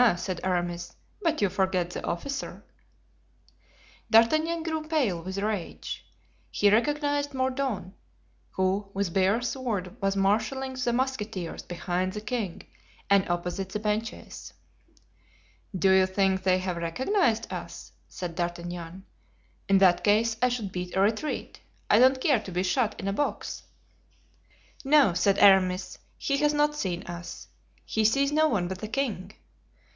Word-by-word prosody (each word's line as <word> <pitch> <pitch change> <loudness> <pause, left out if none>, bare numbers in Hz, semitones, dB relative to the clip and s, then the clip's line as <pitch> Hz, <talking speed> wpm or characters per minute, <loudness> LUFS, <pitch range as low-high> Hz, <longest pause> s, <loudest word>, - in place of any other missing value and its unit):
said 180 0 -4
Aramis, 175 -2 -2 0.3
"but 325 - 0
you - - +5
forget 185 -2 0
the - - -6
officer." 270 +11 -4 1.5
D'Artagnan 310 +9 +4
grew 320 -1 -2
pale 255 - 0
with 190 +3 -6
rage. 205 -3 -3 0.5
He 205 -1 +3
recognized 290 +4 +1
Mordaunt, 260 -8 -2 0.6
who 190 +2 -1
with 195 -4 -1
bare 195 +5 +2
sword 230 -8 -3
was 195 0 +1
marshalling 220 +7 0
the 255 -2 -1
musketeers 225 -8 -2
behind 180 +1 -2
the 210 - -5
king 215 -4 -4 0.5
and 200 -2 +4
opposite 180 +2 -2
the 210 - -3
benches. 215 +2 -4 1.2
"Do 190 +1 +4
you 190 0 +5
think 190 0 +1
they 185 -1 +3
have 185 -1 -3
recognized 230 - 0
us?" - - -7 0.2
said 180 -2 -5
D'Artagnan. 175 +1 -5 0.6
"In 195 - +6
that 180 -2 +4
case 220 +2 +3
I 250 - +4
should 230 -6 -3
beat 180 0 -5
a - - +2
retreat. 220 +9 -1 0.3
I 210 - +6
don't 260 +1 +5
care 260 -2 +3
to 200 - -9
be 180 +1 0
shot 215 +3 0
in 195 - -4
a 195 - 0
box." 290 +8 -2 1.2
"No," 275 - +5
said 195 +3 +2
Aramis, 190 -2 +4 0.2
"he 280 - 0
has 295 +1 +2
not 295 0 +3
seen 185 -11 -3
us. 170 0 -8 0.4
He 220 - 0
sees 275 +6 +3
no 310 +1 +4
one 200 - 0
but 185 0 -5
the 215 - -5
king. 215 -6 -3
200 Hz, 140 wpm, -27 LUFS, 185-260 Hz, 1.5 s, In